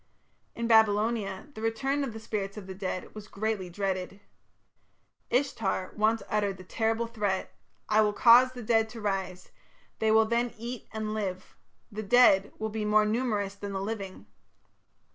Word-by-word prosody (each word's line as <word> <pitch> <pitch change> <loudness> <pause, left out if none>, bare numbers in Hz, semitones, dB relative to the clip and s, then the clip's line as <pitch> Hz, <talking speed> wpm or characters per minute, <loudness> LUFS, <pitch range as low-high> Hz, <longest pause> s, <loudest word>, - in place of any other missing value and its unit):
In 235 - -3
Babylonia 220 0 +2
the 220 - -9
return 270 +6 0
of 270 - -3
the 225 - -8
spirits 205 -2 -4
of 205 - -7
the 190 - -7
dead 185 -1 -5
was 215 -1 -9
greatly 205 -3 -3
dreaded. 190 +1 -3 1.1
Ishtar 225 -8 -1
once 220 +1 +1
uttered 205 -2 -1
the 185 - -11
terrible 225 +4 -1
threat: 210 -5 -2 0.3
"I 215 0 +4
will 210 -1 +3
cause 245 +4 +6
the 245 -2 -8
dead 225 0 +2
to 230 +1 -9
rise; 190 -3 -3 0.5
they 220 - +2
will 220 0 +5
then 235 +2 -1
eat 235 +1 -7
and 215 0 -3
live. 190 -4 -4 0.4
The 215 +1 -5
dead 200 -2 +5
will 220 - -3
be 215 0 -3
more 210 0 +4
numerous 210 -3 -1
than 200 0 -7
the 195 - -2
living." 195 - -5
215 Hz, 160 wpm, -28 LUFS, 195-225 Hz, 1.1 s, cause